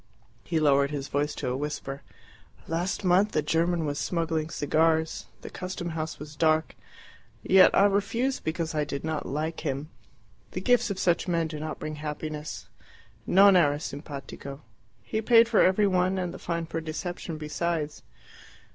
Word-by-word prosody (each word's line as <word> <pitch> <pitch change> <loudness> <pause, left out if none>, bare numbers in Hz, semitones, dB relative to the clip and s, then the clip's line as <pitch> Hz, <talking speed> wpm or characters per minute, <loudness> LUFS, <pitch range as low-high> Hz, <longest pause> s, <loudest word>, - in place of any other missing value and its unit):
He 165 -2 0
lowered 140 -2 +4
his 140 -2 -4
voice 145 +1 -1
to 130 - -3
a 125 - -1
whisper. 140 -1 -4 0.7
"Last 175 +5 -2
month 190 +3 +3
a 155 - +2
German 165 +2 +1
was 145 0 -2
smuggling 165 -2 -1
cigars. 160 +1 +1
The - - -8
custom 185 -1 -5
house 160 -1 -4
was 150 0 -10
dark. 155 +1 +2 0.7
Yet 190 0 +7
I 200 - +6
refused 215 +6 0
because 160 0 -2
I 150 -1 +1
did 140 -1 -5
not 155 -1 -3
like 155 +3 -3
him. 145 0 -4 0.6
The - - -2
gifts 245 -2 +3
of 200 - -3
such 175 -2 +1
men 170 -2 +1
do 155 -1 -5
not 155 +1 -4
bring 155 0 -5
happiness. 150 0 -5 0.6
NON 195 +1 +7
ERA 145 -5 +4
SIMPATICO. 140 -1 -7 0.4
He 220 - -2
paid 230 +1 +6
for 230 -2 +4
every 190 +3 +4
one, 185 -1 +2
and 180 -2 -2
the - - -9
fine 170 -1 -2
for 165 0 -4
deception 160 +1 -5
besides." 155 0 -2
160 Hz, 165 wpm, -27 LUFS, 150-180 Hz, 0.7 s, Yet